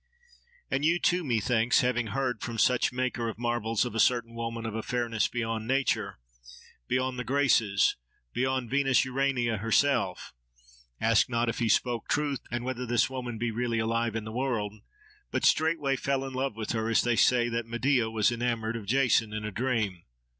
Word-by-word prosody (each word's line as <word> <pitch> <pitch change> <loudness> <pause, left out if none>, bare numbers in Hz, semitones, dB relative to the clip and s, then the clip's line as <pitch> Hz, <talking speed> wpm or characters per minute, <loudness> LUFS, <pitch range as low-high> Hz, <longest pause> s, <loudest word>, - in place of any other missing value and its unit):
And 135 - 0
you 165 +3 +3
too, 180 +1 +1
methinks, 120 -2 +2
having 120 -2 0
heard 130 +2 -2
from 115 -2 -5
some 125 - +4
such - - +1
maker 125 -2 -2
of 110 - -7
marvels 120 -1 0
of 120 - -5
a 115 - -2
certain 120 -1 +2
woman 115 0 -4
of 110 - -4
a 110 - -3
fairness 115 -2 -1
beyond 115 -2 -3
nature—beyond 105 - -3
the - - -2
Graces, 120 -8 +2 0.4
beyond 130 -1 -1
Venus 135 -2 +3
Urania 130 -3 0
herself—asked 65 - -1
not 120 -1 0
if - - -3
he 115 -2 +1
spoke 120 +2 +1
truth, 145 -3 0
and 120 +1 -3
whether 125 -1 -3
this 120 +2 +2
woman 125 -3 -5
be 115 +1 -1
really 115 0 -1
alive 115 0 0
in 110 - -2
the 110 - -7
world, 115 -4 -2 0.6
but - - -1
straightway 155 -4 +2
fell 135 0 -1
in 135 - -6
love 130 -3 -2
with 110 -1 -4
her; 110 -1 -1
as 115 - +3
they 120 -1 +1
say 120 0 +4
that 115 0 -3
Medea 120 0 +1
was 110 0 +2
enamoured 115 -2 -2
of 110 -3 -7
Jason 120 -2 +2
in 110 0 -4
a 105 - -4
dream. 110 -6 -1
120 Hz, 180 wpm, -28 LUFS, 110-130 Hz, 0.6 s, some